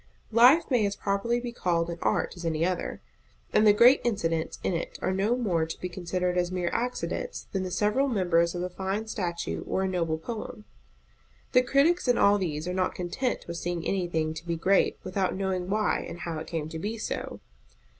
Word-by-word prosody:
Life 250 +9 +7
may 245 -4 +3
as 200 - -3
properly 200 +5 0
be 240 0 -5
called 170 -6 0
an 170 - -6
art - - 0
as 175 - -9
any 165 0 0
other; 180 0 -2 0.5
and 215 - +5
the - - +9
great 240 +6 +6
incidents 165 -8 -1
in - - 0
it 170 - -4
are 185 - -1
no 200 +5 +1
more 180 -10 0
to 160 - -6
be 180 - -4
considered 180 0 -1
as 175 0 -1
mere 180 -1 -1
accidents 370 - -3
than 190 - -1
the 185 - -3
several 210 +9 +1
members 175 -7 +2
of 175 - -2
a 180 - -2
fine 195 +4 -3
statue 175 -6 -3
or 190 - 0
a - - +1
noble 165 -4 -1
poem. 215 +4 -7 0.9
The 250 - +6
critics 280 +6 +2
in 245 -1 +4
all 205 0 +5
these 160 -3 -3
are 180 - -2
not 185 0 0
content 225 +8 -2
with 170 0 -5
seeing 175 -1 -3
anything 165 -4 -1
to 160 +2 -9
be 170 - 0
great 190 +4 +2
without 185 0 -1
knowing 190 -1 -2
why 215 +1 +1
and 175 - -8
how 165 -2 -3
it 160 - -7
came 160 -3 -3
to 160 0 -6
be 215 +6 -3
so. 215 - -4
185 Hz, 205 wpm, -27 LUFS, 170-215 Hz, 0.9 s, the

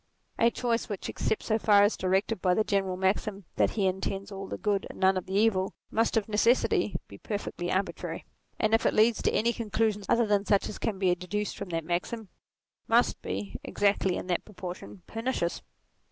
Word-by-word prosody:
A 230 - +5
choice 235 -1 -1
which 205 -3 -4
except 220 - -1
so 220 0 +1
far 205 -2 +5
as 205 - +3
directed 190 +2 0
by 180 -1 +3
the 220 - +3
general 195 -3 0
maxim 195 +1 0
that - - +4
he 200 - +2
intends 195 +1 -2
all 195 0 -6
the - - -5
good 205 -2 0
and - - -10
none 190 0 +4
of 185 - -3
the 190 - -3
evil, 200 -3 +2 0.2
must 225 +1 +2
of 215 - +1
necessity 225 +4 +2
be - - -12
perfectly 200 -4 -4
arbitrary; 190 +1 -2 0.3
and 215 0 +1
if 225 - +4
it - - +1
leads 220 +1 +4
to - - +2
any 235 +2 +2
conclusions 215 -2 -1
other 235 0 +4
than 205 -2 +2
such 200 -1 +2
as - - -7
can 210 -3 -2
be 185 -2 +3
deduced 195 +4 -3
from 200 - -6
that 165 -2 -2
maxim, 180 +5 -3 0.6
must - - +3
be, 100 +1 -4
exactly 200 -2 +1
in - - -5
that 180 -1 -1
proportion, 185 -2 -8
pernicious. 225 -7 -2
200 Hz, 195 wpm, -28 LUFS, 190-220 Hz, 0.6 s, A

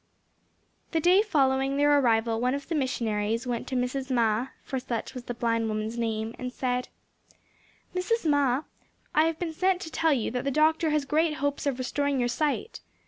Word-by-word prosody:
The 325 - +3
day 360 +5 +5
following 275 -8 +1
their 290 0 +5
arrival 225 -2 +2
one 250 +2 +1
of 280 - -6
the 335 - -3
missionaries 230 -5 -1
went 240 -2 -3
to 265 - -3
Mrs. 255 +2 -1
Ma, 235 -1 +2 0.2
for 265 - -3
such 235 -3 -4
was 250 -1 -8
the 245 - -4
blind 230 -1 0
woman's 215 +1 -2
name, 225 -1 -2
and 250 0 -4
said: 250 -1 -1 1.1
"Mrs. 365 +2 0
Ma, 285 -2 +2 0.5
I 310 +1 +5
have 325 -1 0
been 330 -2 -3
sent 370 +2 +1
to 320 - -7
tell 325 0 +2
you 245 -7 0
that 250 0 -2
the 275 - 0
doctor 315 +3 +3
has 300 -2 +1
great 305 +2 +1
hopes 285 0 -2
of 270 -3 0
restoring 280 +2 -1
your 245 0 +1
sight. 300 - -1
265 Hz, 190 wpm, -27 LUFS, 240-305 Hz, 1.1 s, day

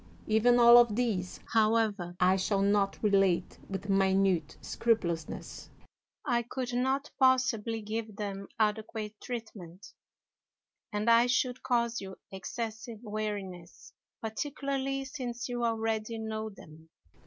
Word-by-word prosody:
Even 220 +3 +4
all 240 0 +9
of 235 -3 +4
these, 210 -7 -1
however, 215 -5 +2
I 185 +1 +5
shall 195 +1 +1
not 200 0 +2
relate 195 -4 +2
with 195 +1 -5
minute 190 -4 +2
scrupulousness. 170 -9 -2 0.6
I 240 -1 +2
could 245 +1 -5
not 265 +3 0
possibly 240 -4 +2
give 215 0 -4
them 200 -1 -5
adequate 215 0 -1
treatment, 210 -7 -8 1.0
and 210 +1 -2
I 230 +1 +6
should 250 0 0
cause 235 -2 0
you 190 -1 -8 0.2
excessive 225 +4 -5
weariness, 205 -5 -6 0.3
particularly 275 +3 -2
since 250 -3 -5
you 245 -1 -3
already 225 -1 -1
know 220 0 -4
them. 160 -5 -15
220 Hz, 115 wpm, -30 LUFS, 195-240 Hz, 1.0 s, all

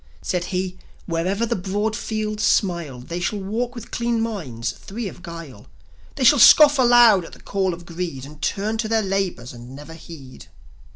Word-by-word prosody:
Said 180 -2 -1
he: 185 0 -3 0.3
"Wherever 185 +6 -1
the - - -1
broad 205 +4 -2
fields 215 -1 -3
smile, 170 - 0
They 170 +7 -6
shall 190 +4 -2
walk 230 +6 -3
with 235 -2 -10
clean 235 -1 -1
minds, 145 - -3
free 210 - -7
of 180 - -10
guile; 165 - -10 0.5
They 275 - -2
shall 265 +3 +6
scoff 290 +4 +8
aloud 240 -6 +6
at - - -12
the - - -13
call 195 -2 -1
of 175 0 -8
Greed, 170 -6 -5
And 150 +1 -14
turn 215 +8 -2
to 220 - -1
their 225 0 +1
labours 190 -11 -2
and 120 +2 -11
never 150 +3 -10
heed." 150 -6 -12
190 Hz, 180 wpm, -22 LUFS, 165-220 Hz, 0.5 s, scoff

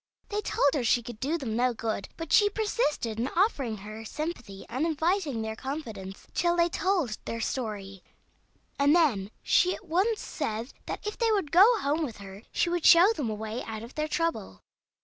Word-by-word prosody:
They 420 0 -1
told 285 -8 +2
her 280 -5 0
she 240 +1 +3
could 235 -2 -9
do 295 +7 0
them 240 -8 -4
no 245 0 +2
good; 220 -3 -3
but 330 -1 -4
she 410 -1 +6
persisted 410 - -1
in 240 - 0
offering 280 - +1
her 215 +2 -8
sympathy 240 - -6
and 260 +5 -2
inviting 320 - 0
their 220 0 -4
confidence, 220 -8 -6
till 345 0 +2
they 340 0 +3
told 345 - 0
their 230 - -4
story, 210 -5 -4 0.8
and 285 +3 +5
then 235 - +2
she 365 0 +3
at - - -14
once 395 +7 +1
said 230 -4 -4
that - - -5
if 420 - -4
they 460 -2 +3
would 390 -9 0
go 410 +8 +7
home 300 +3 0
with 245 -8 -5
her 195 0 -10
she - - +1
would 345 -1 -1
show 360 +6 +7
them 285 - -3
a 215 - -2
way 220 +3 -5
out 220 0 -6
or 230 - -8
their 305 +3 -3
trouble. 330 +1 -2
280 Hz, 195 wpm, -28 LUFS, 220-345 Hz, 0.8 s, go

